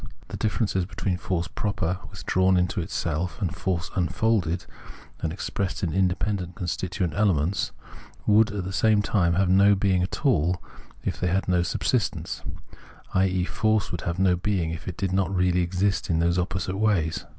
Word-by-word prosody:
^ - - -19 0.3
Ine - - -4
differences 100 -3 0
between 95 -2 -2
force 90 -2 -2
proper, 95 -4 -2
withdrawn 95 +1 +2
into 90 +2 +1
itself, 85 0 -2
and 95 -4 -2
force 90 -2 -2
unfolded 90 -1 +1 0.5
and 80 - -2
expressed 95 +2 -3
in 85 -4 0
independent 95 0 0
con 90 - -4
stituent 90 -1 -2
elements, 95 -3 +1 0.5
would 105 +1 +5
at 100 -2 -3
the 95 +1 -5
same 105 0 +3
time 85 -5 +2
have 95 +2 +2
no 100 +2 +5
being 95 -2 +2
at 95 +10 -3
all 90 - +3 0.4
if - - -2
they 90 - 0
had 95 +3 0
no 90 -1 +3
subsistence; 100 +5 -1 0.7
i.e. 95 -1 +2
force 110 0 +1
would 85 - -3
have 85 0 -3
no 95 -1 +3
being 90 -2 -1
if 80 - -7
it 90 - -5
did 95 -2 -1
not 95 0 +1
really 90 0 +2
exist 95 +4 0
in 85 - +2
these 85 +2 +2
opposite 95 +1 -2
ways. 95 -7 +1
95 Hz, 175 wpm, -25 LUFS, 85-100 Hz, 0.7 s, would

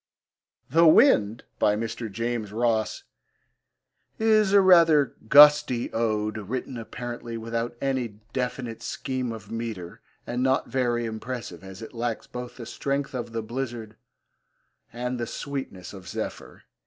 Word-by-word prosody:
The 165 +5 +5
Wind, 135 - +5 0.2
by 105 - +3
Mr. 115 0 -4
James 115 -1 -3
Ross, 110 -1 0 1.1
is 215 -2 +3
a 200 - +7
rather 165 -7 +6
gusty 145 -3 +6
ode, 110 -1 0
written 125 +5 -4
apparently 120 0 -6
without 115 +1 -3
any 130 -6 -1 0.2
definite 125 -3 -3
scheme 130 -2 -3
of 110 -2 -9
metre, 110 -7 -5 0.2
and 120 +1 -2
not 130 +1 +2
very 120 -2 0
impressive 110 -5 -6
as 95 +2 -9
it - - -10
lacks 115 -1 -3
both 125 0 -8
the 120 - -7
strength 140 +4 -2
of 120 -2 -4
the 115 -1 -3
blizzard 115 -2 -5 1.0
and 125 +1 -3
the 120 - -2
sweetness 135 -12 -6
of 95 -3 -11
Zephyr. - - -6
120 Hz, 130 wpm, -26 LUFS, 110-130 Hz, 1.1 s, a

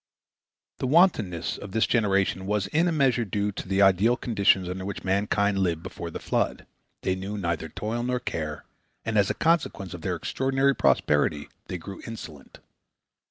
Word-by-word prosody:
The 130 - -1
wantonness 115 - +2
of 100 -1 -9
this 110 - +3
generation 100 -4 +1
was 105 -1 0
in 160 - +1
a - - +2
measure 135 -6 +2
due 105 0 -1
to 95 - -7
the 95 +1 +3
ideal 100 +6 +4
conditions 100 -6 +2
under 90 +1 -4
which 100 +1 -5
mankind 100 +1 +1
lived 85 -4 0
before 85 - -6
the - - -6
flood. - - -1 0.4
They 95 - +1
knew 95 +3 -5
neither 85 -4 -2
toil 115 +3 -3
nor 125 +1 -1
care, 75 -8 -4 0.4
and 115 - -2
as 100 -2 +4
a - - -1
consequence 155 - 0
of 85 - -8
their 90 +2 -1
extraordinary 135 - +1
prosperity 75 - +2 0.2
they 90 - -4
grew 95 +3 -9
insolent. 80 -11 -9
100 Hz, 170 wpm, -26 LUFS, 90-115 Hz, 0.4 s, ideal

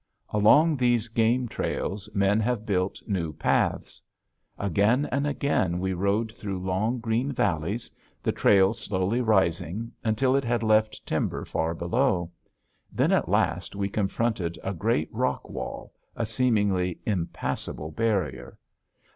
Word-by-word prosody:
Along 145 +10 +5
these 120 -3 +1
game 115 +3 +2
trails 100 -2 -3
men 100 +1 +3
have 110 -1 -1
built 95 -2 -1
new 85 -7 -2
paths. - - 0 0.6
Again 105 - +2
and 140 +3 0
again 140 -11 0
we 95 +1 -1
rode 100 +5 0
through 100 -4 -5
long 95 +6 -1
green 115 +4 0
valleys, 100 - -1 0.3
the - - +1
trail 95 0 +4
slowly 105 +1 -1
rising 100 0 +1
until 125 +4 +2
it 140 - +2
had 120 -1 0
left 110 0 +2
timber - - -2
far 80 +1 -1
below. 85 0 0 0.6
Then - - +1
at - - +2
last 85 +3 0
we 100 0 -1
confronted 100 -4 -1
a 95 - -2
great 95 -4 -1
rock - - -1
wall, - - -6 0.2
a 115 - -1
seemingly 105 -6 +1
impassable 85 -4 -3
barrier. 100 -3 -1
105 Hz, 130 wpm, -26 LUFS, 95-115 Hz, 0.6 s, Along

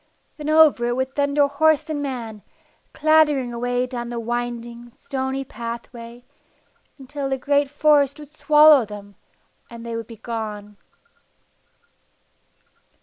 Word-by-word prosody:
Then 300 -1 -5
over 310 -6 +5
it 240 - -1
would 260 +1 -2
thunder 285 0 +2
horse 295 +2 +2
and 305 -2 -3
man, 235 -6 -5 0.5
clattering 300 -5 +2
away 245 +1 -1
down 240 -2 -6
the 240 -1 -4
winding, 240 0 -5
stony 265 +2 -4
pathway, 235 +1 -8 0.7
until 275 0 -6
the 265 - -1
great 285 +1 +1
forest 290 -1 +2
would 300 0 -13
swallow 300 -3 +6
them, 205 -1 -10 0.6
and 235 0 -10
they 230 -1 -5
would 230 -1 -5
be 230 - -11
gone. 210 -2 -6
255 Hz, 125 wpm, -22 LUFS, 235-285 Hz, 0.7 s, swallow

